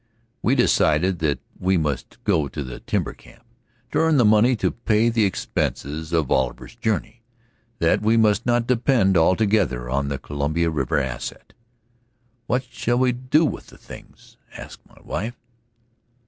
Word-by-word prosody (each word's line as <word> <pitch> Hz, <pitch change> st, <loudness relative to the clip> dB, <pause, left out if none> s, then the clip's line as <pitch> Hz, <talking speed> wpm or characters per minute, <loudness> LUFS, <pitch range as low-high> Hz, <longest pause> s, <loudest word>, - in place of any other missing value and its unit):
We 125 Hz, -, +2 dB
decided 90 Hz, -, +2 dB
that 75 Hz, -3 st, 0 dB, 0.2 s
we 95 Hz, +1 st, +2 dB
must 75 Hz, -4 st, -3 dB
go 75 Hz, -3 st, +1 dB
to 75 Hz, +1 st, -6 dB
the 65 Hz, -2 st, -8 dB
timber -, -, -2 dB
camp -, -, -19 dB, 0.5 s
to -, -, +1 dB
earn 160 Hz, -2 st, +3 dB
the 120 Hz, -, +4 dB
money 110 Hz, +4 st, +4 dB
to -, -, 0 dB
pay 115 Hz, 0 st, +1 dB
the 115 Hz, -2 st, +2 dB
expenses 80 Hz, -4 st, -3 dB
of 80 Hz, -5 st, 0 dB
Oliver's 65 Hz, -2 st, -1 dB
journey, 115 Hz, 0 st, -2 dB, 0.6 s
that 85 Hz, -, +2 dB
we 110 Hz, +2 st, +3 dB
must 110 Hz, -2 st, +3 dB
not 120 Hz, -1 st, +1 dB
depend 120 Hz, -5 st, +2 dB
altogether 90 Hz, -, +2 dB
on 70 Hz, +1 st, 0 dB
the 70 Hz, -1 st, -2 dB
Columbia 75 Hz, +4 st, -1 dB
River 70 Hz, -5 st, -1 dB
asset. 65 Hz, -3 st, -5 dB, 0.9 s
"What 125 Hz, +1 st, 0 dB
shall 120 Hz, +1 st, -1 dB
we 130 Hz, 0 st, +3 dB
do 130 Hz, +6 st, +2 dB
with -, -, -4 dB
the -, -, -16 dB
things?" -, -, -14 dB, 0.2 s
asked -, -, -10 dB
my -, -, -20 dB
wife. 115 Hz, +5 st, -4 dB
95 Hz, 155 wpm, -22 LUFS, 75-120 Hz, 0.9 s, the